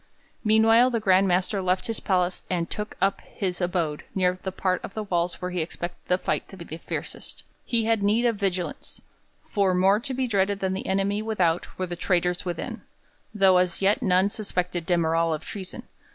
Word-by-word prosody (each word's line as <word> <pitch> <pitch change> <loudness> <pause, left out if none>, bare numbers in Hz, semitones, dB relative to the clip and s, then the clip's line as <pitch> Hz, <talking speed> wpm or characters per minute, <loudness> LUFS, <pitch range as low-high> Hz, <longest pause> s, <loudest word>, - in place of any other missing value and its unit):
Meanwhile 225 +3 +5
the 235 -2 0
Grand 195 -2 +4
Master 185 +2 +1
left 185 0 0
his 225 -2 -3
palace 180 -2 0
and 170 -2 0
took 210 0 -4
up 195 0 +1
his 185 -2 -4
abode 175 -4 -1
near 185 -1 +1
the 190 - -3
part 185 -1 -1
of - - -8
the 215 - -2
walls 175 -3 -1
where 180 0 -4
he 180 -1 -1
expected 175 +2 -5
the 180 - +3
fight - - -2
to 195 - -12
be 170 -3 -7
fiercest. - - -6 0.2
He 230 -2 0
had 225 -2 +2
need 215 +4 +2
of 235 -2 +3
vigilance; 185 -3 -3 0.5
for 195 -3 +2
more 190 +3 +4
to 260 +3 -4
be 260 0 0
dreaded 200 -3 +1
than 190 -1 -1
the 190 - -4
enemy 195 +2 +1
without 185 -7 0
were 185 - -1
the 175 -1 -5
traitors 180 0 0
within, 175 -2 -4 0.5
though 195 -3 +5
as 180 -1 +1
yet 200 +6 +3
none 190 -3 +3
suspected 180 -5 -3
de 175 - +3
Merall 165 0 +2
of 155 - -9
treason. 190 -3 -7
190 Hz, 195 wpm, -26 LUFS, 180-205 Hz, 0.5 s, Meanwhile